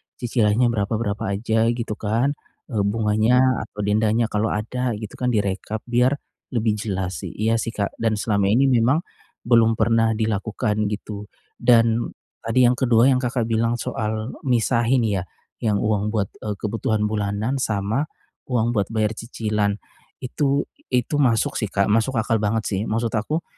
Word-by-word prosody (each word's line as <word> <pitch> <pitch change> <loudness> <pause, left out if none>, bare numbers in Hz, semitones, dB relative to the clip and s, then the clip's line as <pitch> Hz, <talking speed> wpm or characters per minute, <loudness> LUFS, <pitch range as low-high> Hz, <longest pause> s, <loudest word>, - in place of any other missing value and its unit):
cicilannya 120 -1 +2
berapa-berapa 105 -1 -1
aja, 110 +2 +1
gitu 115 -3 -4
kan. 115 +6 +1 0.4
Eee, 110 - -1
bunganya, 115 +4 +3
atau 105 -1 -6
dendanya 110 +2 +1
kalau 105 +1 +1
ada 115 +3 -2
gitu 105 -1 -8
kan 125 - 0
direkap 105 -1 -1
biar, 125 +3 +2 0.4
lebih 115 -1 +2
jelas 95 -5 -3
sih. - - -7
Iya 115 +2 +1
sih, 115 +1 -4
Kak, 100 -1 -3
dan 110 -1 +1
selama 105 -2 +1
ini 130 +7 +4
memang, 130 +7 +3 0.4
belum 115 -1 +4
pernah 115 0 +2
dilakukan 105 0 -1
gitu. 105 0 -5 0.3
Dan, 115 -1 +3 0.2
tadi 115 +3 +2
yang 125 0 +3
kedua 125 +1 +4
yang 125 - +3
Kakak 125 -1 -1
bilang 115 +1 +1
soal, 110 0 -3 0.2
misahin 120 0 +2
ya, 100 -4 -1 0.3
yang 105 -3 0
uang 105 -1 +1
buat, 100 -3 0
eee, 105 -1 -4
kebutuhan 105 +1 -1
bulanan 105 +4 -1
sama, 110 +5 -1 0.4
uang 120 -2 +1
buat 105 -4 0
bayar 110 -1 +1
cicilan, 105 -3 -1 0.5
itu 140 +2 0 0.3
itu 125 +4 +1
masuk 120 -5 +2
sih, 110 - -1
Kak, 100 +1 +1
masuk 115 +4 +2
akal 110 0 +1
banget 110 +2 0
sih. 95 -2 -1
Maksud 115 +1 -1
aku, 150 +10 -1
110 Hz, 155 wpm, -22 LUFS, 105-120 Hz, 0.5 s, ini